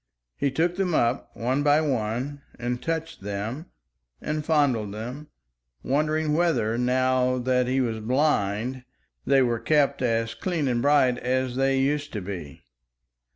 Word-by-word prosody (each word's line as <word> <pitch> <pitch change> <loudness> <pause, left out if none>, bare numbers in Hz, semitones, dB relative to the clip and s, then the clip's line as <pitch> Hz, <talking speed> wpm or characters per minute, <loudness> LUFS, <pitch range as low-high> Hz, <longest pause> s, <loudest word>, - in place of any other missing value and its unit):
He 140 - 0
took 170 +6 0
them 185 -4 0
up 120 -1 +1
one 130 +4 0
by 145 +1 +4
one 130 0 -2 0.2
and 120 +1 -3
touched 165 +1 -3
them 105 - -4 0.5
and 150 0 -3
fondled 130 -10 +1
them, 125 +7 -6 0.6
wondering 155 +2 +1
whether, 155 -10 +1
now 130 +1 +2
that 125 0 +1
he 130 +1 +1
was 115 -3 -1
blind, 125 -1 0 0.4
they 135 -1 +5
were 120 -2 0
kept 140 +2 +2
as 115 -2 0
clean 170 -6 -2
and 120 -2 +1
bright 130 -3 +3
as 130 0 -1
they 135 0 +2
used 145 +2 0
to 105 - -3
be. 90 -7 -7
130 Hz, 145 wpm, -25 LUFS, 120-150 Hz, 0.6 s, they